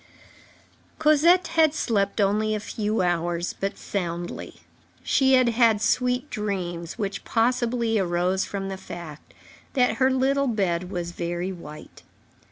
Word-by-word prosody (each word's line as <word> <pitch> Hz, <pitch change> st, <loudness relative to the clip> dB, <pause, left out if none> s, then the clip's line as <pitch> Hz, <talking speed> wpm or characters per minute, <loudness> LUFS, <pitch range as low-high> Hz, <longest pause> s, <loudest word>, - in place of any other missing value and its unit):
Cosette 325 Hz, +3 st, +4 dB
had 320 Hz, -2 st, +3 dB
slept 200 Hz, -6 st, 0 dB
only 210 Hz, +2 st, +2 dB
a -, -, -2 dB
few 210 Hz, 0 st, -2 dB
hours, 175 Hz, 0 st, -1 dB
but 195 Hz, 0 st, -2 dB
soundly. 175 Hz, -3 st, -4 dB, 0.5 s
She 265 Hz, -1 st, +3 dB
had 255 Hz, -2 st, +5 dB
had 230 Hz, -2 st, +3 dB
sweet 250 Hz, +4 st, +1 dB
dreams, 180 Hz, -5 st, -4 dB
which 200 Hz, -3 st, -3 dB
possibly 235 Hz, -1 st, +1 dB
arose 180 Hz, +1 st, 0 dB
from 195 Hz, -1 st, -4 dB
the 190 Hz, -, -5 dB
fact 170 Hz, -5 st, -10 dB, 0.4 s
that 250 Hz, -3 st, +2 dB
her 260 Hz, 0 st, +4 dB
little 270 Hz, +1 st, +1 dB
bed 185 Hz, -6 st, -1 dB
was 175 Hz, -2 st, -4 dB
very 175 Hz, +2 st, -3 dB
white. 155 Hz, -4 st, -11 dB
205 Hz, 130 wpm, -25 LUFS, 175-250 Hz, 0.5 s, had